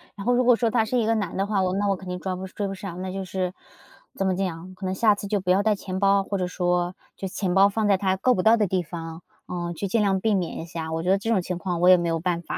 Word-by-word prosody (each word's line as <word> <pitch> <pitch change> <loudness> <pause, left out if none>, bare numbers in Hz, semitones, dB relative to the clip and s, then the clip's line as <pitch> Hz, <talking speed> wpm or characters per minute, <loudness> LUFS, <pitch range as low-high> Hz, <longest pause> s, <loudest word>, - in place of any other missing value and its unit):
然 200 -1 -7
后 245 - +3
如 250 +1 +3
果 245 -1 +6
说 230 -1 +1
他 225 -1 +2
是 250 +3 -1
一 225 - +2
个 225 - +2
男 205 -5 -2
的 195 - +1
话， 205 -2 +1
我 185 0 0
那 205 +1 0
我 195 - +2
肯 185 0 -11
定 180 0 -4
装 185 0 -3
不 190 - -5
追 200 +1 -4
不 195 - -4
上， 185 -2 -7
那 185 0 -4
就 195 0 -4
是 185 0 -3 0.6
怎 195 - -1
么 185 - +1
讲， 180 -1 -4
可 190 - -7
能 185 - -1
下 210 +1 +4
次 200 - -6
就 205 0 0
不 180 - -4
要 190 +2 +4
带 215 -1 +3
钱 190 -1 -5
包， 195 0 +3
或 200 0 -3
者 180 -1 -1
说 180 0 0 0.2
就 195 - -5
钱 185 -1 -2
包 195 +1 +6
放 215 +1 0
在 195 -2 +4
他 190 -1 +1
够 250 +7 +2
不 185 - 0
到 225 +1 +6
的 210 -2 +2
地 185 0 0
方， 165 0 -7 0.3
呃， 175 -1 -4
去 200 - -3
尽 215 +4 +1
量 195 -2 +2
避 220 +2 +1
免 180 -4 -2
一 - - -5
下。 160 -1 -6
我 160 0 -2
觉 180 - -1
得 195 - +5
这 205 +3 -4
种 205 -5 +3
情 180 0 -4
况 175 -1 -3
我 180 - +6
也 185 - +8
没 170 -1 -1
有 165 0 0
办 170 0 -1
法， - - -5
190 Hz, 355 characters per minute, -25 LUFS, 180-205 Hz, 0.6 s, 也